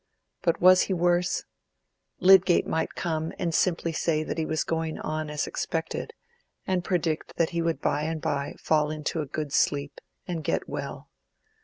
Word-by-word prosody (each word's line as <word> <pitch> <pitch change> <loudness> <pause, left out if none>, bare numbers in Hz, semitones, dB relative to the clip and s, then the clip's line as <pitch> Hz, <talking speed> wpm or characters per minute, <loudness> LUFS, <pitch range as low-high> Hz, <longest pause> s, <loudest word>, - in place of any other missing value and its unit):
But 170 -2 +1
was 185 +1 +7
he - - +2
worse? 175 +1 +1 0.8
Lydgate 185 -1 +6
might 160 - -2
come 160 -1 -2
and 170 -2 -1
simply 170 -1 +1
say 160 -1 0
that 160 - -4
he 160 - -1
was 160 0 0
going 160 -1 -2
on 155 0 -3
as 150 0 -1
he - - -6
expected, 165 -1 -3 0.5
and 185 -2 0
predict 170 -4 -1
that 165 - +1
he 170 -1 -1
would 165 -1 -1
by 145 - +1
and 160 0 -2
by 145 -2 -2
fall 150 -1 +2
into 155 +1 -2
a 150 - -5
good 145 0 -4
sleep, 145 -1 +1 0.3
and 170 -3 -3
get - - -1
well. - - -6
160 Hz, 175 wpm, -27 LUFS, 155-175 Hz, 0.8 s, was